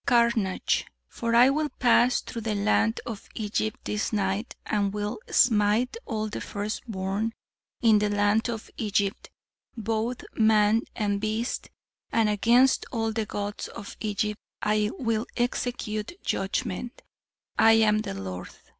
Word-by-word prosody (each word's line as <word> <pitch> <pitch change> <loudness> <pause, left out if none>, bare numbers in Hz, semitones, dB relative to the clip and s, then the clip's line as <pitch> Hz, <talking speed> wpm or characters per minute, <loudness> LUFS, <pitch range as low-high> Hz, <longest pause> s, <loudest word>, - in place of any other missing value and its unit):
"Carnage. 235 -5 +2 0.2
'For 230 0 -2
I 245 +3 +7
will 300 +1 0
pass 245 -1 +3
through 230 - -6
the 215 -1 -1
land 215 +2 +2
of 220 -4 -7
Egypt 215 0 -2
this 210 0 -1
night 200 +1 -1
and 200 -2 0
will 210 - -3
smite 225 - +3
all 215 -3 -2
the 210 - -5
first 210 +1 -4
born 200 +2 -2 0.5
in 220 -2 +6
the 210 0 +1
land 205 +3 +2
of 225 -2 -5
Egypt, 200 -2 -1 0.5
both 225 +2 -2
man 220 0 +4
and 205 -2 0
beast; 220 +3 -2 0.4
and 225 -2 +3
against 235 +6 +4
all 225 -2 0
the 220 -1 -2
gods 205 0 -4
of 200 - -9
Egypt 210 0 -1 0.2
I 210 0 +1
will 230 -3 -1
execute 240 - -2
judgment; 195 +4 -2 0.6
I 225 0 +7
am 215 -1 +4
the 155 - -4
Lord.' 95 -2 -6
215 Hz, 135 wpm, -27 LUFS, 205-230 Hz, 0.6 s, I